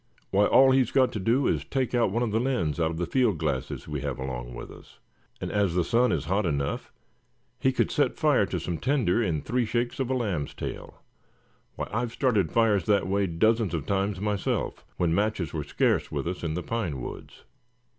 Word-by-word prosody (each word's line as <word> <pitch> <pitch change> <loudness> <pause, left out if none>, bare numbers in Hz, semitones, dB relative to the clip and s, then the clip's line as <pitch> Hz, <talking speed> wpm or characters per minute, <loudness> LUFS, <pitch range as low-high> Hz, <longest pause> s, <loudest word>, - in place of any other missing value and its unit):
"Why, 100 +1 +4
all 135 0 +6
he's 130 -3 +3
got 130 -2 +3
to 110 - -4
do 115 +8 +2
is - - +1
to - - -29
take 130 -3 -1
one 120 -1 +2
of 115 - -1
the 110 - +1
lens 95 - 0
out 80 -1 +2
of 80 - -5
the 85 - -1
field 115 0 +2
glasses 70 -4 -3
we - - -4
have - - -3
along - - -5
with - - -8
us; - - -15 0.4
and - - -4
as 100 -4 +1
the 90 - +3
sun 120 +7 +2
is 75 -4 -1
hot 95 +6 +1
enough, 70 -5 -2 0.7
he 130 - +3
could 130 - 0
set - - +1
fire - - +3
to - - -2
some 85 -3 -4
tinder 120 - +1
in 85 -9 -1
three 125 +2 0
shakes 120 +2 -1
of 130 -2 -1
a 130 - +1
lamb's 100 - -2
tail. - - -7 0.7
Why, - - -4
I've 115 +1 -1
started 105 - +1
fires 105 -6 +3
that 105 -4 +2
way 100 +1 +1
dozens 110 +3 +2
of 75 -4 -3
times 100 0 0
myself, 105 -1 -2
when 85 -2 +1
matches 100 -4 0
were 75 -2 -2
scare - - +2
with - - -3
us 90 0 -4
in 80 -2 -2
the 90 - -3
pine 95 - -2
woods." - - -8
100 Hz, 215 wpm, -27 LUFS, 85-120 Hz, 0.7 s, all